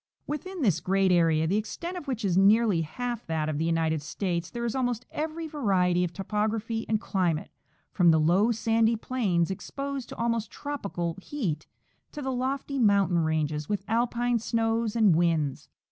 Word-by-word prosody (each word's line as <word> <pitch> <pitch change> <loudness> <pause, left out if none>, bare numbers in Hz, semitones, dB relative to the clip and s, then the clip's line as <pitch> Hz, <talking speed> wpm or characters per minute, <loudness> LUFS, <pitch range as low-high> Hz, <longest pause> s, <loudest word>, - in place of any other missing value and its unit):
169 305 +6 -5
Within - - -1
this 185 -8 +3
great 190 +1 +2
area, 165 -3 +3
the 190 +6 +1
extent 335 - -4
of 350 -5 -7
which 240 -5 -2
is 180 -3 +1
nearly 200 -1 +4
half 240 +9 -4
that 160 -2 -1
of 155 -1 -2
the 160 - 0
United 160 -2 +1
States, 170 +2 -3
there 235 -1 -4
is 230 - -1
almost 245 -2 -1
every 320 +2 -3
variety 190 - +1
of 175 - -2
topography 215 +4 -2
and 215 -1 +2
climate, 180 -7 -1 0.4
from 175 -3 +4
the 160 -1 +5
low 180 +9 +3
sandy 225 0 +2
plains 200 -8 0
exposed 275 +6 -5
to - - -7
almost 230 -1 -1
tropical 200 - -4
heat 185 - -3 0.4
to 295 - -6
the 265 - -1
lofty 265 +2 -2
mountain 200 -6 +3
ranges 155 -2 -1
with 205 -2 -1
alpine 240 +1 +1
snows 225 0 0
and 215 -7 +5
winds. 160 -5 0
210 Hz, 175 wpm, -27 LUFS, 170-240 Hz, 0.4 s, the